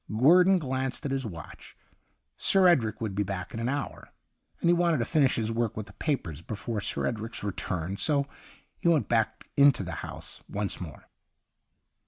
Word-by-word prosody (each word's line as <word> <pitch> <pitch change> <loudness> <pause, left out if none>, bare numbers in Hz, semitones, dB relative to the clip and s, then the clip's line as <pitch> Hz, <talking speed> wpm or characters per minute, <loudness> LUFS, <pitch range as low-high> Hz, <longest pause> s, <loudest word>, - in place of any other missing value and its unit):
Guerdon 175 - +5
glanced 130 -2 -2
at 140 - -1
his 135 -3 -1
watch. 85 -5 -10 0.6
Sir 190 - +5
Edric 120 -13 +2
would 110 -3 -2
be 100 - 0
back 95 -2 -4
in 115 - -4
an 115 +2 -1
hour, 140 +1 -4 0.5
and - - 0
he 170 - +6
wanted 170 -2 +2
to 115 - 0
finish 140 -1 +3
his 110 -1 0
work 115 -2 -1
with 110 - -4
the 100 - -15
papers 85 - -2
before 105 +3 -4
Sir 100 - -1
Edric's 115 -1 -4
return, 95 -2 -3
so 140 +1 +2 0.5
he - - -1
went 165 -4 +3
back 115 -2 0
into 140 -7 +5
the 90 - -5
house - - -6
once 100 -1 -2
more. 85 -4 -9
115 Hz, 180 wpm, -28 LUFS, 100-145 Hz, 0.6 s, he